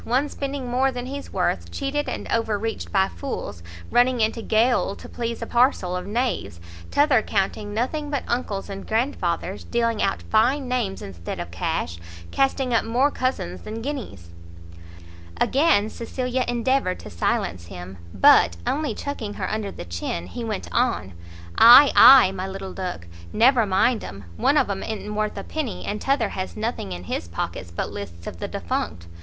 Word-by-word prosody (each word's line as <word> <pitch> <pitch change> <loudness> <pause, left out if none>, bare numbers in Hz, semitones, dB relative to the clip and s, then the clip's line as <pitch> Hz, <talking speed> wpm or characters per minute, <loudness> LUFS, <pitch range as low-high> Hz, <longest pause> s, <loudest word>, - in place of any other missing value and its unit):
one 260 +5 +1
spending 280 -2 -4
more 260 +2 +2
than 245 -1 -5
he's 280 +2 -7
worth, - - -1
cheated 285 +1 -2
and - - -5
over 225 -2 +1
reached 200 - -4
by 95 - +3
fools, 85 -1 -6 0.3
running 245 +1 +3
into 225 +1 +1
gaol 225 -2 +2
to - - -11
please 235 -1 -4
a - - -3
parcel 240 -7 +2
of 180 +1 -4
knaves; 230 - -2 0.3
t'other 285 -5 +4
counting 205 +1 -1
nothing 275 +7 -2
but 285 -2 -2
uncles 215 -5 -2
and 195 -1 -7
grandfathers, 200 - -1
dealing 230 -2 0
out 195 - +1
fine 255 +5 +2
names 240 -6 -2
instead 85 -3 -7
of - - -5
cash, 85 +1 -2 0.3
casting 270 -2 +1
up 230 - +3
more 250 +6 +2
cousins 175 - -2
than 220 +1 -6
guineas 205 - -6 0.6
" 85 0 -18
Again 265 -8 +3
Cecilia 250 +3 -3
endeavoured 245 -4 +1
to - - -10
silence 85 0 -1
him, 90 +1 -9
but, 85 +1 +5
only 300 +1 -1
chucking 235 -8 -5
her - - -3
under 215 -2 -2
the - - -8
chin, 85 0 -4
he 235 - -6
went 215 -3 -4
on, 235 - 0 0.5
"Ay, 250 +5 +10
ay, 255 -7 +9
my 190 0 -4
little 195 0 -6
duck, 180 - -5 0.3
never 235 -1 +4
mind 215 +5 +2
'em; 100 -1 -8
one 285 - +2
of 280 - +3
'em 200 -1 -3
i'n't 210 -1 -5
worth 215 0 -2
a - - -4
penny, 295 -9 -4
and 210 +1 -3
t'other 270 -6 +1
has 185 +2 -5
nothing 220 - -3
in 90 0 -6
his 85 -1 -4
pockets 85 0 -4
but 85 - -4
lists 85 -4 -8
of 85 - -7
the - - -3
defunct. 85 -2 -3
220 Hz, 175 wpm, -24 LUFS, -, 0.6 s, Ay